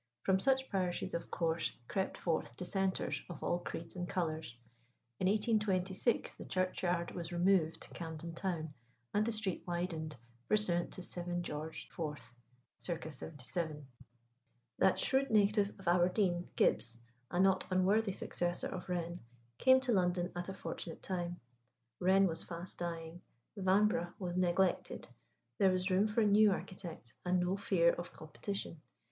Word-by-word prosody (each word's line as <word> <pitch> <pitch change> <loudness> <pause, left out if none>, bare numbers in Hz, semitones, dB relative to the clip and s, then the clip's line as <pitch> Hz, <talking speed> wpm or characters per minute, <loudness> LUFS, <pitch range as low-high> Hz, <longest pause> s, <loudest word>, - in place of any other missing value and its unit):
From 190 0 +3
such 265 +5 +3
parishes 185 -3 -1
of 170 - -3
course 165 -1 0 0.2
crept 190 -1 -1
forth 160 -8 -1
Dissenters 190 +1 0
of 175 - -7
all 175 - +1
creeds 170 -1 -6
and 180 0 -4
colours. 160 -8 -2 0.6
In 185 - +2
1826 205 -1 +1
the - - -8
churchyard 180 -2 0
was 170 -1 -5
removed 175 -2 +2
to - - -7
Camden 165 0 -6
Town, 165 -4 -3 0.4
and 210 - +3
the 230 - 0
street 215 -5 -2
widened, 170 -3 -2 0.3
pursuant 185 -5 +3
to 185 - -5
7 175 0 -3
George 155 0 -5
IV. 150 -7 -5 0.4
c. 170 -2 -4
77. 150 +1 -5 0.9
That 190 - +5
shrewd 275 +1 +2
native 205 -2 +4
of 195 - -11
Aberdeen, 175 0 +2
Gibbs 115 0 +5 0.3
a 175 - -1
not 190 0 +4
unworthy 195 +3 +3
successor 175 -2 0
of 185 0 -6
Wren 175 -1 -2 0.4
came 260 0 +7
to 260 -2 0
London 180 -3 +2
at 175 +1 -4
a - - -3
fortunate 170 -2 -6
time. 175 -2 -3 0.6
Wren 190 +2 +5
was 165 -3 -1
fast 175 +1 -7
dying; 170 0 -4 0.3
Vanbrugh 190 -2 +2
was 175 -2 -3
neglected; 180 0 +1 0.5
there 195 - +6
was 185 +1 0
room 195 +3 +4
for 215 +2 +1
a - - +4
new 210 0 +6
architect, 175 -9 -6
and 180 0 +2
no 180 +2 +1
fear 180 -4 +3
of 175 - -6
competition. 165 +1 -5
180 Hz, 145 wpm, -35 LUFS, 170-195 Hz, 0.9 s, came